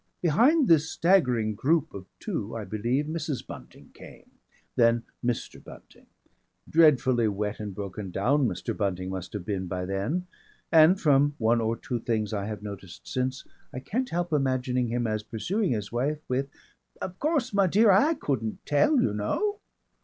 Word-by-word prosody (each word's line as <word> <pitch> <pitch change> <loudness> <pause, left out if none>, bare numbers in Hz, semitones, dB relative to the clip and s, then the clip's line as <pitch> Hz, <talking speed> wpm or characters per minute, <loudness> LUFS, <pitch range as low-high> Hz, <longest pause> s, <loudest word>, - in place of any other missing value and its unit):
Behind 250 - +4
this 160 -1 +4
staggering 125 - +2
group 155 +8 +1
of 95 -1 -9
two 105 +3 -4
I 115 - -4
believe 115 +8 -1
Mrs. 155 -3 -4
Bunting - - -12
came. - - -14 0.4
Then 115 0 +3 0.2
Mr. 120 -1 -3
Bunting. - - -15 0.6
Dreadfully 130 -7 +4
wet 105 +1 -3
and 105 -3 -6
broken 100 0 -6
down 130 +9 +2
Mr. 95 - -4
Bunting 95 -2 -2
must 95 -2 -6
have 100 -4 -5
been 95 -3 -3
by 90 +1 -3
then, 100 - -2 0.5
and 165 +4 +6
from 145 -1 +3
one 115 +1 +2
or 115 +1 -1
two 120 -2 -4
things 110 -2 -2
I 100 -1 -2
have 105 -1 -6
noticed 100 -3 -9
since, 130 +1 -2 0.3
I 125 - -5
can't 250 - -2
help 175 -1 -2
imagining 130 -3 0
him 120 +1 -1
as 110 -1 -1
pursuing 170 - -1
his 105 -2 -4
wife 135 +6 -1
with, 135 +2 -1 0.5
"Of 185 0 -6
course, 290 -6 0
my 200 -1 +4
dear, 210 +4 +5
I 285 - +4
couldn't 115 - -3
tell, 200 - +3
you 105 - +1
know!" 410 - -1
125 Hz, 165 wpm, -27 LUFS, 105-160 Hz, 0.6 s, and